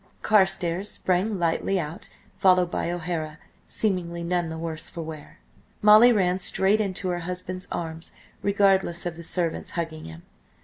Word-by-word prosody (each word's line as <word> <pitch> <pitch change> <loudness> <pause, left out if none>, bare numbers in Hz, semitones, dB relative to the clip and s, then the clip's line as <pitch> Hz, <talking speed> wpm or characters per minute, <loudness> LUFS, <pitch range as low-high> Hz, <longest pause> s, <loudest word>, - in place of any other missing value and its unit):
Carstares 190 -2 +2
sprang 190 +3 0
lightly 175 +3 0
out, 160 0 -6 0.3
followed 185 -2 +3
by - - -2
O'Hara, 165 -3 -4 0.3
seemingly 175 -5 -1
none 175 -1 -1
the 160 - -6
worse 160 -1 -3
for 165 - -6
wear. 155 -2 -10 0.4
Molly 215 +4 +7
ran 185 -4 +1
straight 195 +3 +2
into 190 -2 -2
her 175 -1 -2
husband's 180 +1 -3
arms, 165 0 -4 0.3
regardless 195 -4 +2
of 175 -2 -3
the 170 - -10
servants, 165 -1 0
hugging 160 -2 -4
him. 80 +1 -11
175 Hz, 145 wpm, -25 LUFS, 165-190 Hz, 0.4 s, Molly